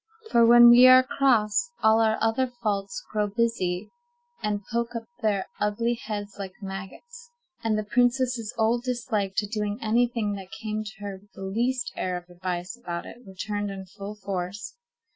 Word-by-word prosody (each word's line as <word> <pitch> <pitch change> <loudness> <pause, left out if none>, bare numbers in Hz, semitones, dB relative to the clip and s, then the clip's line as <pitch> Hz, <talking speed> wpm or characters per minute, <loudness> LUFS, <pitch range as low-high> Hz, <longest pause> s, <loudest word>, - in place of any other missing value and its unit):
For 235 - +5
when 240 0 +9
we 245 +2 +9
are 255 0 +8
cross, 255 - +2
all 220 +1 +5
our 220 -1 +3
other 225 +4 +2
faults 205 -5 -3
grow 210 -1 0
busy, 205 -4 -1 0.5
and 210 -2 -2
poke 235 0 -1
up 230 - -3 0.2
their 205 -3 +1
ugly 220 +3 0
heads 205 -3 -6
like 190 -2 -5
maggots, 205 - -9 0.3
and 220 -1 +1
the 215 - -1
princess's 245 0 +1
old 230 +2 +2
dislike 225 -6 -2
to 215 - +1
doing 210 -1 -2
any 235 +2 +2
thing 225 -4 -2
that 190 -1 -10
came 215 -1 -3
to 215 0 -10
her 195 -1 -6
with 205 0 -26
the 195 - -9
least 240 +5 -1
air 180 -1 -2
of 175 0 -11
advice 180 +3 -4
about 175 -8 -6
it - - -11
returned 205 +2 -4
in 195 -1 -7
full 200 +2 -8
force. 195 - -5
215 Hz, 175 wpm, -26 LUFS, 195-240 Hz, 0.5 s, when